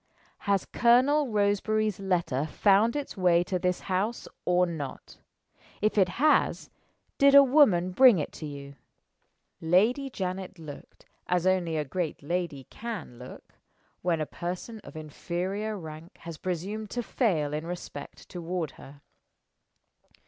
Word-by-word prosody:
Has 200 Hz, -2 st, +2 dB
Colonel 260 Hz, +5 st, +3 dB
Roseberry's 210 Hz, -1 st, +1 dB
letter 170 Hz, -7 st, 0 dB
found 205 Hz, -, +3 dB
its 290 Hz, -1 st, -4 dB
way 175 Hz, -2 st, +3 dB
to 180 Hz, 0 st, -2 dB
this 180 Hz, 0 st, -1 dB
house 200 Hz, +5 st, -2 dB, 0.2 s
or 180 Hz, 0 st, +3 dB
not? 155 Hz, -6 st, -7 dB, 0.6 s
If 215 Hz, +1 st, +1 dB
it 190 Hz, -3 st, +4 dB
has, 295 Hz, +11 st, +2 dB, 0.5 s
did 280 Hz, 0 st, +6 dB
a 280 Hz, -, +11 dB
woman 250 Hz, -, +4 dB
bring 250 Hz, +1 st, +7 dB
it 150 Hz, -, -3 dB
to 155 Hz, -, -7 dB
you?" 140 Hz, -1 st, -9 dB, 0.8 s
Lady 220 Hz, -, +2 dB
Janet 190 Hz, -4 st, -4 dB
looked 155 Hz, -3 st, -11 dB, 0.2 s
as 180 Hz, 0 st, +1 dB
only 180 Hz, -4 st, +1 dB
a 150 Hz, -, -1 dB
great 160 Hz, +1 st, -3 dB
lady 170 Hz, -3 st, -2 dB
can 210 Hz, -, -7 dB
look, 125 Hz, -, -12 dB, 0.5 s
when 170 Hz, -2 st, 0 dB
a 155 Hz, -, -1 dB
person 180 Hz, +8 st, -6 dB
of 200 Hz, -, -13 dB
inferior 180 Hz, +7 st, -4 dB
rank 160 Hz, -1 st, -10 dB
has 165 Hz, -2 st, -8 dB
presumed 195 Hz, +4 st, -4 dB
to 240 Hz, +3 st, -3 dB
fail 165 Hz, -, 0 dB
in 155 Hz, +2 st, -3 dB
respect 175 Hz, -5 st, -8 dB
toward 175 Hz, -3 st, -4 dB
her. 140 Hz, +1 st, -13 dB
180 Hz, 135 wpm, -28 LUFS, 165-215 Hz, 0.8 s, a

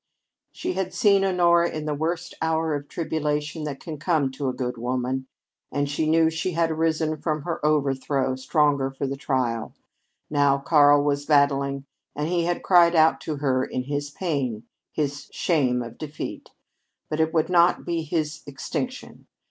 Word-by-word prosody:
She -, -, -3 dB
had 185 Hz, 0 st, -3 dB
seen 200 Hz, -2 st, +4 dB
Honora 170 Hz, -2 st, +3 dB
in 155 Hz, -1 st, -5 dB
the 150 Hz, -, -1 dB
worst 165 Hz, +4 st, -3 dB
hour 160 Hz, -1 st, 0 dB
of 145 Hz, 0 st, -4 dB
tribulation 150 Hz, -1 st, -2 dB
that 140 Hz, -2 st, -5 dB
can 155 Hz, -3 st, -7 dB
come 155 Hz, -4 st, +1 dB
to 135 Hz, 0 st, -3 dB
a -, -, 0 dB
good 125 Hz, -1 st, -3 dB
woman, 130 Hz, +2 st, -2 dB, 0.4 s
and 145 Hz, 0 st, 0 dB
she 155 Hz, +2 st, -1 dB
knew 160 Hz, 0 st, +4 dB
she 160 Hz, +3 st, -2 dB
had 165 Hz, 0 st, +1 dB
arisen 160 Hz, -1 st, 0 dB
from 155 Hz, -1 st, -2 dB
her 170 Hz, -2 st, -4 dB
overthrow, 135 Hz, -3 st, +1 dB
stronger 140 Hz, 0 st, +1 dB
for 135 Hz, +1 st, -4 dB
the 135 Hz, 0 st, -2 dB
trial; 130 Hz, -4 st, -2 dB, 0.5 s
now 145 Hz, -2 st, +3 dB
Karl 145 Hz, 0 st, +5 dB
was 145 Hz, 0 st, -1 dB
battling, 140 Hz, -2 st, +2 dB, 0.3 s
and 150 Hz, +1 st, -2 dB
he 170 Hz, 0 st, 0 dB
had 175 Hz, 0 st, -1 dB
cried 175 Hz, -2 st, +5 dB
out 160 Hz, 0 st, +4 dB
to 155 Hz, -, -3 dB
her 135 Hz, -3 st, +1 dB
in 130 Hz, -, -3 dB
his 145 Hz, +2 st, -3 dB
pain 140 Hz, -, -2 dB, 0.3 s
his 145 Hz, -1 st, -3 dB
shame 130 Hz, -8 st, +1 dB
of 115 Hz, 0 st, -10 dB
defeat. 155 Hz, -1 st, -6 dB, 0.6 s
But 155 Hz, -, -3 dB
it 160 Hz, 0 st, +2 dB
would 160 Hz, 0 st, +1 dB
not 175 Hz, 0 st, +4 dB
be 170 Hz, -1 st, -1 dB
his 155 Hz, -1 st, -2 dB
extinction. 250 Hz, -, -5 dB
150 Hz, 170 wpm, -24 LUFS, 140-160 Hz, 0.6 s, Karl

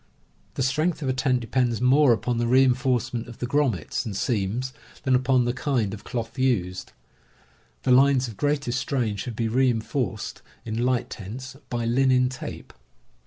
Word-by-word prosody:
The 135 Hz, -, 0 dB
strength 155 Hz, +5 st, 0 dB
of 135 Hz, -, -1 dB
a -, -, +2 dB
tent 130 Hz, -1 st, +1 dB
depends 120 Hz, 0 st, 0 dB
more 130 Hz, +2 st, +5 dB
upon 115 Hz, +2 st, 0 dB
the 120 Hz, -, +1 dB
reinforcement 125 Hz, -2 st, +2 dB
of 120 Hz, -, -10 dB
the -, -, -3 dB
grommets 125 Hz, -, 0 dB
TENTS -, -, -9 dB
AND 105 Hz, -, -4 dB
TOOLS -, -, -1 dB
39 115 Hz, -7 st, +1 dB
and 125 Hz, -, -1 dB
seams 130 Hz, 0 st, -6 dB, 0.3 s
than 130 Hz, -, +2 dB
upon 125 Hz, -1 st, +3 dB
the 120 Hz, -, 0 dB
kind 125 Hz, -8 st, -1 dB
of 105 Hz, -, -8 dB
cloth 115 Hz, +2 st, -5 dB
used. 95 Hz, -9 st, 0 dB, 0.9 s
The 130 Hz, -, +2 dB
lines 130 Hz, 0 st, +5 dB
of 115 Hz, -, -8 dB
greatest 140 Hz, -1 st, 0 dB
strain 120 Hz, -7 st, -1 dB
should 110 Hz, +3 st, -5 dB
be 115 Hz, 0 st, -1 dB
reinforced, 120 Hz, -2 st, -1 dB, 0.2 s
in 115 Hz, +1 st, -2 dB
light 125 Hz, -1 st, 0 dB
tents, 120 Hz, +6 st, -7 dB
by 120 Hz, -1 st, -2 dB
linen 125 Hz, +1 st, +3 dB
tape. 130 Hz, 0 st, -8 dB
125 Hz, 180 wpm, -25 LUFS, 115-130 Hz, 0.9 s, more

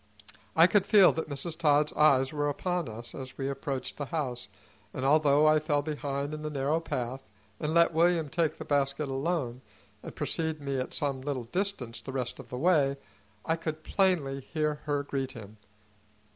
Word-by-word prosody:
I 165 Hz, -, +8 dB
could 195 Hz, +1 st, +3 dB
feel 200 Hz, -4 st, +7 dB
that 160 Hz, -1 st, -4 dB
Mrs. 145 Hz, +4 st, -4 dB
Todd's 150 Hz, -2 st, +3 dB
eyes 135 Hz, -2 st, +4 dB
were 145 Hz, -1 st, 0 dB
upon 175 Hz, 0 st, -2 dB
us 115 Hz, +1 st, -7 dB
as 130 Hz, -2 st, -8 dB
we 135 Hz, -, -2 dB
approached 135 Hz, -1 st, -4 dB
the 145 Hz, -, -4 dB
house, 135 Hz, -7 st, -3 dB, 0.5 s
and 130 Hz, -, -2 dB
although 145 Hz, 0 st, +4 dB
I 155 Hz, 0 st, +5 dB
fell 145 Hz, -1 st, 0 dB
behind 145 Hz, -1 st, -3 dB
in 155 Hz, -, -5 dB
the 155 Hz, -, -3 dB
narrow 145 Hz, +2 st, 0 dB
path, 130 Hz, -4 st, -4 dB, 0.4 s
and 150 Hz, -, -1 dB
let 170 Hz, 0 st, +4 dB
William 165 Hz, -1 st, +3 dB
take 160 Hz, +2 st, 0 dB
the -, -, -7 dB
basket 140 Hz, 0 st, 0 dB
alone 135 Hz, -3 st, -2 dB, 0.4 s
and -, -, -9 dB
precede 160 Hz, +2 st, -2 dB
me 140 Hz, -2 st, -2 dB
at 130 Hz, -, -3 dB
some 140 Hz, -4 st, -1 dB
little 135 Hz, -2 st, -3 dB
distance 130 Hz, -, -3 dB
the 135 Hz, -, -7 dB
rest 125 Hz, -2 st, -3 dB
of -, -, -11 dB
the 125 Hz, -, -5 dB
way, 140 Hz, -3 st, +3 dB, 0.5 s
I 160 Hz, -, +2 dB
could 155 Hz, -1 st, -5 dB
plainly 165 Hz, -10 st, +1 dB
hear 150 Hz, +1 st, -2 dB
her 145 Hz, -1 st, 0 dB
greet 135 Hz, -2 st, -3 dB
him. 110 Hz, -3 st, -11 dB
145 Hz, 185 wpm, -29 LUFS, 135-160 Hz, 0.5 s, I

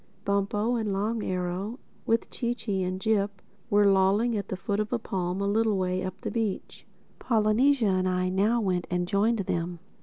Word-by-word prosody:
Bumpo 205 Hz, +4 st, +1 dB
and 215 Hz, -3 st, -1 dB
Long 210 Hz, +3 st, -1 dB
Arrow, 185 Hz, +5 st, -3 dB, 0.3 s
with 230 Hz, 0 st, +1 dB
Chee 240 Hz, 0 st, -2 dB
Chee 200 Hz, -6 st, -2 dB
and 185 Hz, 0 st, -2 dB
Jip, 200 Hz, -1 st, 0 dB, 0.3 s
were 205 Hz, -2 st, +4 dB
lolling 200 Hz, +4 st, +3 dB
at 205 Hz, -, -3 dB
the 190 Hz, -, -4 dB
foot 200 Hz, +1 st, -2 dB
of 215 Hz, 0 st, -2 dB
a 245 Hz, -, +2 dB
palm 185 Hz, -4 st, -3 dB
a 200 Hz, -, 0 dB
little 215 Hz, 0 st, +2 dB
way 185 Hz, 0 st, 0 dB
up 185 Hz, +1 st, -6 dB
the -, -, -3 dB
beach. 225 Hz, -4 st, -3 dB, 0.3 s
Polynesia 230 Hz, +3 st, +3 dB
and 185 Hz, -1 st, +1 dB
I 185 Hz, 0 st, 0 dB
now 205 Hz, +6 st, +2 dB
went 185 Hz, -5 st, -1 dB
and 180 Hz, 0 st, -1 dB
joined 210 Hz, +3 st, +2 dB
them. 175 Hz, -1 st, -2 dB
200 Hz, 185 wpm, -27 LUFS, 185-220 Hz, 0.3 s, were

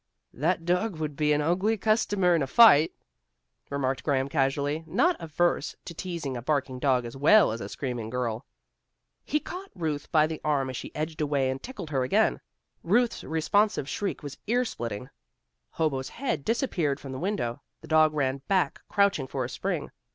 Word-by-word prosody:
"That 165 Hz, +4 st, 0 dB
dog 180 Hz, +3 st, +1 dB
would 155 Hz, -2 st, -4 dB
be 150 Hz, +1 st, +1 dB
an 150 Hz, 0 st, +3 dB
ugly 185 Hz, +8 st, +1 dB
customer 205 Hz, -4 st, +2 dB
in 165 Hz, -, +2 dB
a 135 Hz, -, 0 dB
fight," 160 Hz, -, +7 dB, 0.8 s
remarked 135 Hz, -2 st, -1 dB
Graham 135 Hz, -2 st, 0 dB
casually, 145 Hz, +2 st, 0 dB
not 340 Hz, -, +2 dB
averse 165 Hz, -1 st, 0 dB
to 170 Hz, -, -7 dB
teasing 165 Hz, -6 st, -4 dB
a 120 Hz, -, -4 dB
barking 135 Hz, -1 st, -1 dB
dog 130 Hz, -3 st, +2 dB
as 120 Hz, -, -7 dB
well 165 Hz, -, +5 dB
as 115 Hz, +1 st, -5 dB
a 100 Hz, -, -5 dB
screaming 120 Hz, -4 st, -4 dB
girl. 120 Hz, -2 st, -2 dB, 0.8 s
He 300 Hz, -, 0 dB
caught 370 Hz, +5 st, -8 dB
Ruth 155 Hz, -5 st, -3 dB
by 155 Hz, -3 st, +5 dB
the 155 Hz, 0 st, -5 dB
arm 140 Hz, -3 st, 0 dB
as -, -, -7 dB
she -, -, -6 dB
edged 155 Hz, +1 st, -3 dB
away, 140 Hz, -3 st, +1 dB
and 130 Hz, +1 st, -5 dB
tickled 240 Hz, -11 st, -8 dB
her 135 Hz, -3 st, +1 dB
again. 125 Hz, -, +2 dB, 0.4 s
Ruth's 230 Hz, +6 st, +1 dB
responsive 165 Hz, +1 st, +1 dB
shriek 195 Hz, +1 st, -3 dB
was 140 Hz, -2 st, -7 dB
ear 245 Hz, +3 st, +2 dB
splitting. 120 Hz, -, -5 dB, 0.6 s
Hobo's 140 Hz, -5 st, -1 dB
head 255 Hz, -, -3 dB
disappeared 175 Hz, -, 0 dB
from 135 Hz, -, -8 dB
the 130 Hz, -, -5 dB
window. 170 Hz, -, -2 dB, 0.2 s
The 160 Hz, -, -12 dB
dog 155 Hz, -1 st, +4 dB
ran 135 Hz, -2 st, 0 dB
back, 185 Hz, -7 st, +1 dB
crouching 200 Hz, -9 st, +2 dB
for 130 Hz, -1 st, -3 dB
a -, -, -6 dB
spring. -, -, -3 dB
155 Hz, 180 wpm, -27 LUFS, 135-180 Hz, 0.8 s, fight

